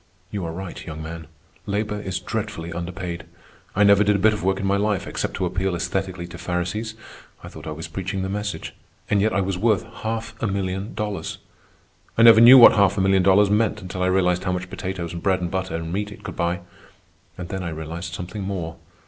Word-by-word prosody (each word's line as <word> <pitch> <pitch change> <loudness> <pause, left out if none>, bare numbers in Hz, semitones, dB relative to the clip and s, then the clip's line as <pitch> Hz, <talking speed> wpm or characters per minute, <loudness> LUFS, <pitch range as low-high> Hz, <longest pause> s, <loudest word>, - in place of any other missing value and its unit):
"You 100 -3 -3
are 80 - -3
right, 90 +2 -7
young 80 -1 -7
man. 80 0 -7 0.4
Labor 105 +1 -2
is 95 -2 -3
dreadfully 85 +1 -4
underpaid. 85 0 -5 0.5
I 105 - +4
never 100 0 +6
did 105 0 +3
a 100 +1 +1
bit 110 - +6
of 105 - -4
work 95 +1 +1
in 100 - -2
my 100 +1 +2
life, 105 -2 0
except - - -3
to 95 - -1
appeal 90 +1 -1
aesthetically 95 0 -3
to 85 -1 -9
Pharisees—I 105 +6 -5
thought - - -10
I - - -3
was 80 +1 -6
preaching 95 +3 -3
the - - -2
message—and 100 0 -3
yet 110 +2 +2
I 100 - +1
was 95 -1 -2
worth 110 -1 +2
half 115 +1 -3
a 115 - +1
million 95 +1 -3
dollars. 105 -2 -3 0.8
I 115 - +6
never 115 -1 +9
knew 125 +3 +11
what 120 - +10
half 100 -1 +3
a - - +2
million 95 0 +4
dollars 100 +2 +5
meant 105 0 +2
until 90 0 -5
I 90 - +2
realized 90 -1 +2
how 90 - 0
much 90 0 -4
potatoes 90 -4 -4
and 85 - -5
bread 95 -2 +2
and 90 -2 -3
butter 95 -2 -2
and 80 0 -4
meat 105 +1 -2
it 105 - -12
could 90 -5 -6
buy. 85 +1 -1 0.8
And 90 -2 -6
then 95 - -3
I 90 - -3
realized 80 +2 -6
something 90 +4 -6
more. 90 -4 -4
95 Hz, 215 wpm, -23 LUFS, 90-105 Hz, 0.8 s, knew